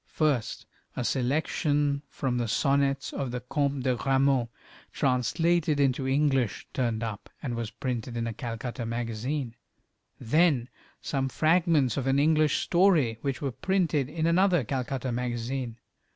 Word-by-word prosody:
First 145 -7 0 0.3
a 125 - -2
selection 145 +2 0
from 125 -4 -2
the 120 - -1
sonnets 140 +3 +1
of 135 -2 -3
the 125 +1 -3
Comte 140 +1 -1
de 130 -1 +2
Grammont, 135 -1 +2 0.4
translated 150 +5 +1
into 135 -1 +1
English, 135 -5 +1
turned 115 -3 -1
up, 110 -3 -5
and 125 -4 -2
was 115 -2 -3
printed 125 -1 -4
in 115 - -1
a 115 - -3
Calcutta 120 +1 -5
magazine; 115 +3 -3 0.7
then 145 -2 +2 0.3
some 135 -2 -1
fragments 155 -4 +2
of 135 -1 -1
an 135 +1 +3
English 155 0 +3
story, 170 - +3
which 140 -1 -3
were 135 - -1
printed 160 -4 0
in 160 +1 -2
another 175 -2 +3
Calcutta 130 +1 -3
magazine. 120 0 -3
135 Hz, 135 wpm, -28 LUFS, 120-150 Hz, 0.7 s, an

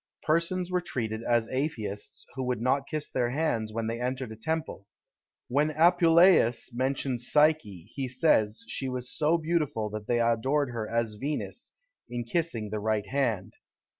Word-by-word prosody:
Persons 170 +3 0
were 180 0 +1
treated 110 -9 -3
as 115 -1 +1
atheists, 120 -7 -4
who 135 - -4
would 125 -3 -1
not 135 +3 +1
kiss 155 -1 -3
their 120 -2 0
hands 120 -6 -1
when 115 +1 -3
they 115 +2 -3
entered 125 -1 -3
a - - -7
temple. 155 -5 -4 0.6
When 145 +5 +2
Apuleius 165 -6 +4
mentions 130 -1 -1
Psyche, 150 - +3
he 135 -2 -3
says, 120 -5 +2
she 135 +3 -2
was 125 -1 -3
so 155 +2 +3
beautiful 155 -10 -1
that 105 -1 -6
they 120 - +2
adored 125 +4 +1
her 110 -3 -4
as 115 -2 -1
Venus, 150 - -4 0.4
in 120 0 -3
kissing 120 -6 -2
the 110 - -2
right 105 0 0
hand. 115 -6 -1
125 Hz, 160 wpm, -28 LUFS, 110-155 Hz, 0.6 s, Apuleius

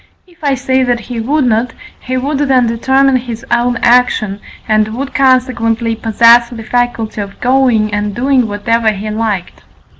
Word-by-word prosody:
If 345 -3 -24
I 280 -2 +1
say 260 0 0
that 245 -2 0
he 235 +1 -6
would 280 +5 0
not, 230 0 0 0.3
he 255 0 -4
would 275 +2 -2
then 265 -4 +2
determine 265 +3 +2
his 240 0 -7
own 240 +1 +1
action, 235 -5 +2 0.3
and 215 0 +2
would 275 +2 -5
consequently 235 -4 +1
possess 230 +2 +4
the 230 -2 -8
faculty 230 -2 -2
of 200 -1 -9
going 245 -5 +1
and 205 -1 -2
doing 255 0 +1
whatever 220 +2 0
he 210 +2 -5
liked. 210 -4 -3
240 Hz, 160 wpm, -13 LUFS, 220-260 Hz, 0.3 s, possess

